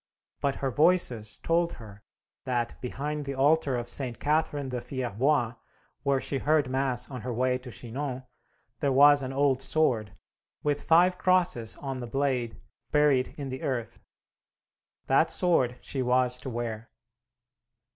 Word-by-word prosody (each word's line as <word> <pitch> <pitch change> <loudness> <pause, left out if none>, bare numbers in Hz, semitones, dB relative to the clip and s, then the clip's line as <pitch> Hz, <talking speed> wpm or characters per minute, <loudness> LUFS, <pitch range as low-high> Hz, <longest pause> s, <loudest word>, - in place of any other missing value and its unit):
But 140 -1 0
her 135 -1 -2
Voices 130 - +2
told 170 +1 +1
her 100 -3 -12 0.4
that, 120 -2 -2
behind 145 +4 -4
the 140 -1 -5
altar 140 0 +3
of 120 -1 -3
St. 125 -3 -3
Catherine 150 -2 0
de 125 -1 -3
Fierbois, 125 0 0 0.5
where 140 -1 +1
she 135 +1 -3
heard 150 -1 +2
mass 130 -2 -1
on 125 -3 -6
her 125 +3 -4
way 125 +2 0
to 125 0 -10
Chinori, 130 +2 -5 0.5
there 140 - +1
was 145 +2 +7
an 130 -1 -4
old 135 -1 +2
sword, 125 -8 +1 0.5
with 145 -1 0
five 180 +2 +4
crosses 175 -13 +2
on 135 -2 -5
the 120 - -5
blade, 125 -3 -1 0.3
buried 145 -4 +2
in 140 -2 -5
the 130 0 -6
earth. 120 -4 -3 1.1
That - - +3
sword 130 -9 +1
she 135 - -3
was 125 0 +2
to 130 - -5
wear. 115 -2 -5
130 Hz, 145 wpm, -28 LUFS, 125-145 Hz, 1.1 s, was